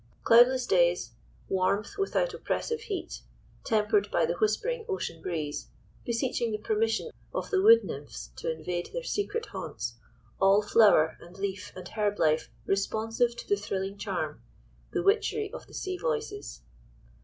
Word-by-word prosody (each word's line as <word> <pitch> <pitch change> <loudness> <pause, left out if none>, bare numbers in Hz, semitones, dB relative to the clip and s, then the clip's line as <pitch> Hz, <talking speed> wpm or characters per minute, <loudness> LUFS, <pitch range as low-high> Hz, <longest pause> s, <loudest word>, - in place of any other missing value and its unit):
Cloudless 245 +2 +6
days, 175 - +3 0.4
warmth, 195 - 0
without - - +1
oppressive 465 -1 -2
heat, 405 -4 -5 0.4
tempered 210 -2 +2
by 170 - +2
the 170 - 0
whispering 320 - 0
ocean 385 - -3
breeze, 155 -4 -3 0.4
beseeching 235 -1 0
the 215 - -1
permission 225 - 0 0.2
of - - -3
the 385 -2 +3
wood 455 +3 +8
nymphs - - -7
to 485 - -2
invade 180 - -4
their - - -3
secret 445 0 -2
haunts, - - -5 0.4
all 195 +2 +5
flower, 205 -7 +5
and 175 +2 -13
leaf, 195 -1 -4
and 185 -1 -8
herb 210 -2 0
life 155 0 +2 0.2
responsive 225 +4 0
to - - -9
the 205 - +3
thrilling 195 -1 -3
charm—the 200 - -5
witchery 420 +1 +1
of - - -8
the - - -17
sea 370 -2 -3
voices. 445 - -3
215 Hz, 145 wpm, -29 LUFS, -, 0.4 s, wood